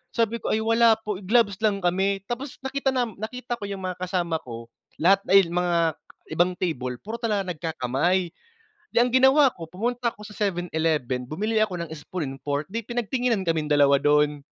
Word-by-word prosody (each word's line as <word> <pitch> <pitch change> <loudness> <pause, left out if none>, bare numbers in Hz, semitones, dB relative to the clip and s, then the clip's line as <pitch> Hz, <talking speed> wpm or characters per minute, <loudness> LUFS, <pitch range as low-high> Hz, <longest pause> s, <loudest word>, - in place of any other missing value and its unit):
Sabi 230 -1 +1
po, - - -3
"Ay 215 - +2
wala 230 0 +5
po, 210 -2 -4
gloves 205 -1 +3
lang 205 -2 +2
kami." 195 +2 +1
Tapos 250 +3 -5
nakita 270 0 -1
nam 240 -5 -1
nakita 240 +3 -4
ko - - -8
yung 195 -1 -6
mga 180 - -3
kasama 175 -3 -1
ko, 115 -1 -8 0.3
lahat 195 +4 +4
dahil 195 -1 +6
mga 170 -2 +1 0.4
ibang 175 +2 +3
table, 125 -8 -2
puro 220 +3 -6
talaga 210 -4 0
nagkakamay. 165 +3 0 0.6
Di - - -14
ang 245 0 0
ginawa 265 +1 +5
ko, 165 -2 -9
pumunta 235 +7 -2
ako 210 - -13
sa 210 - -10 0.2
7-Eleven, 160 -8 -1
bumili 215 +7 -1
ako 210 -4 +1
ng 160 - -13
spoon 160 +2 -5
and 135 - -14
fork, 145 +1 -1
'di 230 - -1
pinagtinginan 240 -3 -1
kaming 160 -3 0
dalawa 140 -2 +4
do'n. 150 0 +2
190 Hz, 180 wpm, -25 LUFS, 160-230 Hz, 0.6 s, dahil